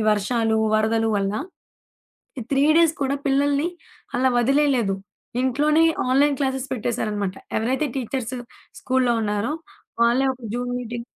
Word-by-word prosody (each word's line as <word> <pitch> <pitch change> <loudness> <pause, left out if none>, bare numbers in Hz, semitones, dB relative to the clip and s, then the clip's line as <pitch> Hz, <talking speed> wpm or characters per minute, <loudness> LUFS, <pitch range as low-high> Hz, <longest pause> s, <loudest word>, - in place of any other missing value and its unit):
వర్షాలు, 220 +2 +1 0.2
వరదలు 225 +1 +2
వల్ల. 200 0 -1 1.0
ఈ - - -3
3 275 +1 +3
డేస్ 330 -2 +4
కూడా 275 +1 0
పిల్లల్ని 285 +3 +2 0.5
అలా 260 +1 +3
వదిలేయలేదు. 260 -4 +2 0.5
ఇంట్లోనే 295 +5 +3 0.3
ఆన్‌లైన్ 280 +2 +3
క్లాసెస్ 265 -1 -1
పెట్టేశారనమాట. 210 -5 -2 0.2
ఎవరైతే 260 +7 0
టీచర్స్ 255 -1 -3 0.5
స్కూలులో 255 -2 +1
ఉన్నారో, 210 +4 -1 0.5
వాళ్ళే 240 +3 +3
ఒక 255 - -21
జూమ్ 245 0 -2
మీటింగ్ 240 -1 -5
250 Hz, 120 wpm, -23 LUFS, 225-275 Hz, 1.0 s, డేస్